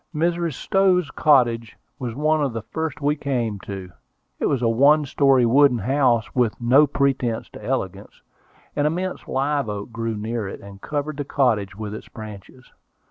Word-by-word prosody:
Mrs. 170 Hz, 0 st, 0 dB
Stowe's 185 Hz, +2 st, +2 dB
cottage 120 Hz, -6 st, +2 dB, 0.2 s
was 120 Hz, -4 st, -4 dB
one 155 Hz, +2 st, +1 dB
of 135 Hz, -4 st, -1 dB
the 115 Hz, -2 st, -4 dB
first 160 Hz, -3 st, -4 dB
we 145 Hz, +1 st, +2 dB
came 120 Hz, -8 st, -2 dB
to. 95 Hz, -2 st, -8 dB, 0.5 s
It -, -, +1 dB
was 130 Hz, -3 st, 0 dB
a -, -, +3 dB
one 140 Hz, +6 st, +4 dB
story, 135 Hz, -2 st, +3 dB
wooden 135 Hz, +1 st, +5 dB
house, 120 Hz, 0 st, +1 dB
with 120 Hz, -4 st, +1 dB
no 130 Hz, +5 st, +5 dB
pretensions 135 Hz, -5 st, 0 dB
to -, -, -12 dB
elegance. -, -, -4 dB, 0.6 s
An 145 Hz, 0 st, +2 dB
immense 180 Hz, +4 st, -3 dB
live 140 Hz, -2 st, 0 dB
oak 105 Hz, +2 st, -5 dB
grew 115 Hz, -1 st, -3 dB
near 110 Hz, 0 st, -3 dB
it, -, -, -7 dB
and 100 Hz, -1 st, -12 dB
covered 150 Hz, 0 st, -3 dB
the 145 Hz, -, -2 dB
cottage 110 Hz, -9 st, 0 dB
with 105 Hz, 0 st, -6 dB
its 110 Hz, -, -8 dB
branches. 110 Hz, +3 st, -11 dB
130 Hz, 170 wpm, -22 LUFS, 115-145 Hz, 0.6 s, wooden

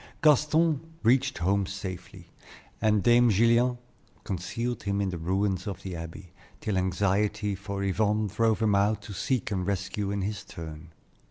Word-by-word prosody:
Gaston 155 Hz, +1 st, +4 dB, 0.2 s
reached 130 Hz, +3 st, +3 dB
home 95 Hz, +2 st, +1 dB
safely, 95 Hz, -2 st, -7 dB, 0.5 s
and 105 Hz, -3 st, +3 dB
Dame 120 Hz, 0 st, +5 dB
Gillian 115 Hz, +4 st, +3 dB, 0.5 s
concealed 115 Hz, +7 st, -3 dB
him 100 Hz, 0 st, -1 dB
in 100 Hz, -1 st, 0 dB
the 90 Hz, -, -4 dB
ruins 95 Hz, +2 st, 0 dB
of 95 Hz, -2 st, -5 dB
the 95 Hz, -2 st, -5 dB
Abbey, 85 Hz, +2 st, -8 dB, 0.3 s
till 105 Hz, -3 st, -2 dB
anxiety 100 Hz, +3 st, +1 dB
for 100 Hz, 0 st, -4 dB
Yvonne 105 Hz, +2 st, +1 dB
drove 110 Hz, +2 st, +1 dB
him 105 Hz, -2 st, +3 dB
out 100 Hz, +1 st, +2 dB
to 100 Hz, -, -8 dB
seek 120 Hz, +2 st, -1 dB
and 95 Hz, -3 st, -1 dB
rescue 100 Hz, +1 st, -2 dB
in 100 Hz, -1 st, -1 dB
his 105 Hz, 0 st, -3 dB
turn. 80 Hz, -1 st, -9 dB
100 Hz, 155 wpm, -28 LUFS, 95-110 Hz, 0.5 s, Dame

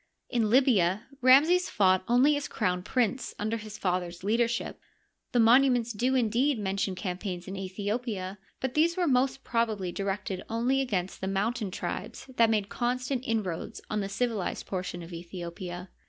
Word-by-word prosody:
In 230 Hz, -4 st, +1 dB
Libya, 215 Hz, -6 st, +4 dB, 0.2 s
Ramses 310 Hz, +8 st, +6 dB
fought 185 Hz, -3 st, +3 dB
only 255 Hz, +5 st, +5 dB
as 290 Hz, 0 st, -3 dB
crown 180 Hz, -4 st, -1 dB
prince 250 Hz, +4 st, -1 dB
under 215 Hz, +2 st, -1 dB
his 215 Hz, -1 st, -8 dB
father's 180 Hz, -1 st, -2 dB
leadership. 230 Hz, +3 st, 0 dB, 0.5 s
The 245 Hz, -, +2 dB
monuments 240 Hz, 0 st, +5 dB
do, 250 Hz, +5 st, +1 dB
indeed, 250 Hz, +3 st, +2 dB
mention 195 Hz, -2 st, -1 dB
campaigns 180 Hz, -1 st, -4 dB
in 190 Hz, -, -5 dB
Aethiopia, 200 Hz, +1 st, -3 dB, 0.2 s
but 260 Hz, -1 st, -2 dB
these 335 Hz, +3 st, +2 dB
were 360 Hz, -, +2 dB
most 265 Hz, -1 st, +1 dB
probably 220 Hz, -6 st, 0 dB
directed 195 Hz, 0 st, -3 dB
only 245 Hz, +4 st, +1 dB
against 190 Hz, -8 st, -2 dB
the 190 Hz, -, -2 dB
mountain 210 Hz, +3 st, -1 dB
tribes 185 Hz, +5 st, -5 dB
that 230 Hz, -1 st, +5 dB
made 210 Hz, -3 st, +1 dB
con 245 Hz, +3 st, -1 dB
stant 255 Hz, 0 st, -3 dB
inroads 205 Hz, -7 st, -2 dB
on 215 Hz, -, 0 dB
the 195 Hz, -, -3 dB
civilized 215 Hz, -2 st, -2 dB
portion 180 Hz, -2 st, -4 dB
of 165 Hz, -, -11 dB
Aethiopia. 175 Hz, +1 st, -7 dB
215 Hz, 155 wpm, -28 LUFS, 185-245 Hz, 0.5 s, Ramses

